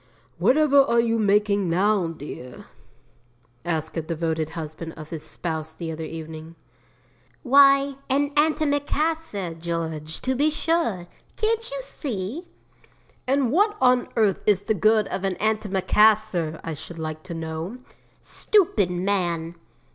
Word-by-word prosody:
'Whatever 280 - +5
are 235 -4 +2
you 230 -1 +1
making 205 -2 +2
now, 190 +1 +2
dear?' 145 -6 -9 1.0
asked 160 -2 -3
a 165 - -1
devoted 160 -1 -2
husband 160 +1 -6
of 155 -1 -11
his 160 -2 -5
spouse 160 -2 -5
the 165 -2 -5
other 160 0 -5
evening. 160 0 -8 0.9
'Why, 275 0 +5
an 285 +2 +1
antimacassar, 295 - 0
George, 160 -2 -4
to 260 - 0
be 290 +4 +2
sure; 305 - -1 0.3
can't 455 +2 0
you - - -5
see?' 270 - -5 0.8
'And 265 -2 +2
what 415 +6 +2
on 250 -1 +3
earth 215 -4 +2
is 200 -2 +3
the 220 - +1
good 215 0 +3
of 190 - -4
an 190 -1 0
antimacassar, 210 -4 +2
I 165 - -4
should 165 +3 -9
like 155 -1 -5
to 175 -2 -6
know?' 165 +6 -5 0.5
'Stupid 330 - +2
man!' 175 -3 -1
200 Hz, 130 wpm, -24 LUFS, 165-270 Hz, 1.0 s, Whatever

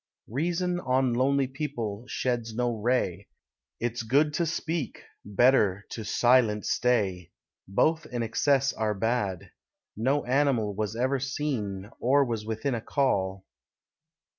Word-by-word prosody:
Reason 175 - -1
on 130 -4 +1
lonely 135 +3 +2
people 125 -6 -4
sheds 120 -4 -2
no 120 0 0
ray; 110 -5 0 0.5
It's 120 0 -2
good 140 +7 +2
to 170 +2 0
speak 160 -3 -3 0.2
better 105 -2 +3
to 110 - -5
silent 115 -1 +3
stay: 100 -8 +1 0.4
Both 160 - +1
in 120 -1 -3
excess 135 +4 +2
are 110 -1 -1
bad. 100 -4 -1 0.4
No 135 +7 +1
animal 125 -5 +2
Was 105 +1 -3
ever 130 +3 +1
seen, 125 -8 -3
or 140 +3 +4
was 115 -3 -4
within 115 +5 -2
a 115 - -2
call. 95 -9 0
120 Hz, 125 wpm, -27 LUFS, 105-135 Hz, 0.5 s, or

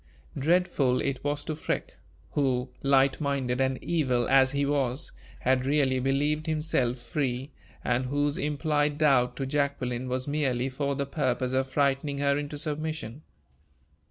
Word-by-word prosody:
Dreadful 155 -5 +2
it 135 -2 -2
was 145 0 -1
to 155 - -3
Freke, 155 - -3 0.3
who, 130 -3 0
light 135 +1 +3
minded 135 -3 0
and 130 0 +1
evil 130 -8 +1
as 135 -1 +5
he 140 0 0
was, 140 -2 0 0.3
had 130 0 +2
really 135 -3 +2
believed 145 +4 0
himself 150 -6 0
free, 130 +1 -3 0.3
and 125 +1 0
whose 145 +2 0
implied 150 0 0
doubt 135 -5 +3
to 135 - -3
Jacqueline 130 -3 -1
was 130 +1 -2
merely 135 -4 0
for 140 +1 -2
the 140 0 -1
purpose 130 -3 -1
of 130 0 +1
frightening 140 +1 0
her 140 0 +2
into 145 0 -4
submission. 150 -3 -4
140 Hz, 145 wpm, -28 LUFS, 130-145 Hz, 0.3 s, as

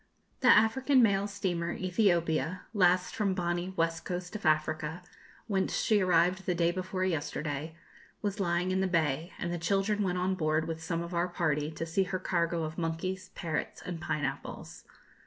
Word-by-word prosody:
The 255 - +1
African 250 +4 +5
mail 200 -2 +3
steamer, 180 -4 -2
'Ethiopia,' 180 -3 +1
last 180 -3 +3
from 200 -3 +1
Bonny, 175 0 -1
West 165 -1 0
Coast 180 +2 -5
of 205 -6 -2
Africa, 155 +2 0 0.4
whence 195 -3 0
she 215 -2 +3
arrived 180 +1 +2
the 180 - +1
day 170 0 +2
before 185 +1 -2
yesterday, 155 -2 -3 0.4
was 205 -1 -3
lying 175 -1 +1
in 190 0 +1
the 190 - +2
bay, 160 -2 0
and 175 0 -3
the 175 - -3
children 195 +5 +1
went 180 -2 0
on 185 +1 +1
board 155 -2 0
with 160 -1 -4
some 165 +1 -2
of 170 +1 -7
our 170 +1 +1
party 155 -4 0
to 165 +1 -4
see 165 +4 +1
her 185 0 -2
cargo 170 -2 0
of 155 +1 -4
monkeys, 175 +3 -3
parrots, 165 -4 -3
and 175 -3 -5
pineapples. 145 -4 -4
175 Hz, 175 wpm, -30 LUFS, 165-190 Hz, 0.4 s, African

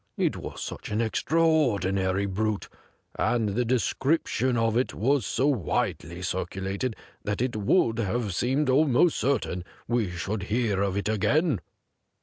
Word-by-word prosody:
It - - +1
was - - -6
such - - -6
an 105 - -1
extraordinary 110 - +2
brute, 105 +1 -1 0.5
and 115 -1 +1
the 115 +5 0
description 130 - +1
of 115 -1 +1
it 125 +2 0
was 130 -2 +1
so 130 +7 0
widely 90 - -1
circulated 95 +5 -2 0.3
that 105 0 -2
it 125 -1 -1
would 115 - +2
have 110 -1 -1
seemed 130 +9 +1
almost 145 +4 +4
certain 110 -8 0 0.2
we 120 -5 +1
should 95 +4 -3
hear 110 -4 +1
of 100 -1 0
it 100 0 -1
again. 135 - +2
110 Hz, 135 wpm, -27 LUFS, 100-130 Hz, 0.5 s, almost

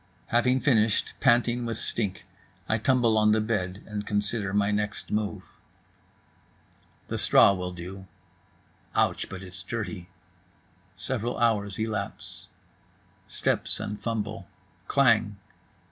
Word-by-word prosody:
Having 125 +2 +3
finished, 115 -6 +2
panting 120 -1 +3
with 115 -1 -3
stink, 105 -4 -3 0.4
I 110 - +1
tumble 120 -2 +3
on 105 0 +4
the 110 - +3
bed 105 -4 -2
and 105 -1 -4
consider 105 0 -1
my 100 +1 +2
next 105 0 -2
move. 105 -1 -2 1.6
The - - -2
straw - - +6
will 90 -1 -4
do. 95 +2 -8 0.9
Ouch, - - +1
but 95 +1 -7
it's 90 0 -9
Dirty.—Several 105 +4 -7
hours 105 -4 +1
elapse…. 110 -1 -4 0.8
Steps - - -1
and 105 0 -5
fumble. 105 -5 -3 0.4
Klang. 115 -7 +3
105 Hz, 110 wpm, -27 LUFS, 100-115 Hz, 1.6 s, straw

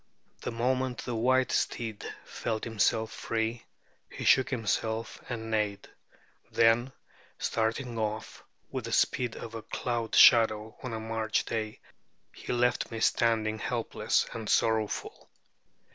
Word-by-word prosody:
The - - -3
moment 125 +1 -1
the 125 - -3
white 130 +3 +2
steed 110 -3 -1 0.2
felt 110 -2 -3
himself 110 0 +1
free, 115 +1 -3 0.4
he - - -7
shook 130 - +5
himself 110 -2 -2
and 110 -2 -4
neighed. 105 -2 -1 0.6
Then, 115 +3 +4 0.5
starting 115 +1 -1
off 110 0 -4 0.3
with - - -4
the - - -4
speed 125 -3 +1
of 115 - -8
a 115 - -5
cloud 120 0 -3
shadow 110 -2 +6
on 125 -3 -5
a 110 - -3
March 110 -1 -1
day, 110 -2 -3 0.5
he - - -6
left 125 0 +1
me 115 - -5
standing 110 -1 +2
helpless 120 -1 0
and 110 -2 -5
sorrowful. 110 -2 0
115 Hz, 130 wpm, -29 LUFS, 110-120 Hz, 0.6 s, shadow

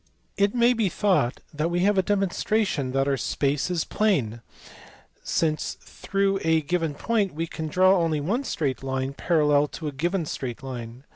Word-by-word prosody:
It 200 +3 +1
may 240 +1 +4
be 220 -5 +1
thought 180 - +1
that 150 +3 -1
we 175 +1 0
have 205 +2 +3
a 190 - +4
demonstration 195 -6 0
that 135 0 +1
our 140 -1 +1
space 140 +4 -1
is 175 -3 0
plane, 130 - 0 0.8
since 155 -2 -1
through 195 0 -1
a 160 0 +3
given 165 -1 -1
point 205 -2 0
we 165 +2 -1
can 160 -1 -5
draw 185 +4 +4
only 165 -3 +1
one 205 - -1
straight 145 - -2
line 135 0 -2
parallel 150 -2 +2
to 155 +1 -7
a - - -2
given 170 +5 -1
straight 130 -3 -5
line. 120 -1 -7
160 Hz, 170 wpm, -25 LUFS, 140-195 Hz, 0.8 s, may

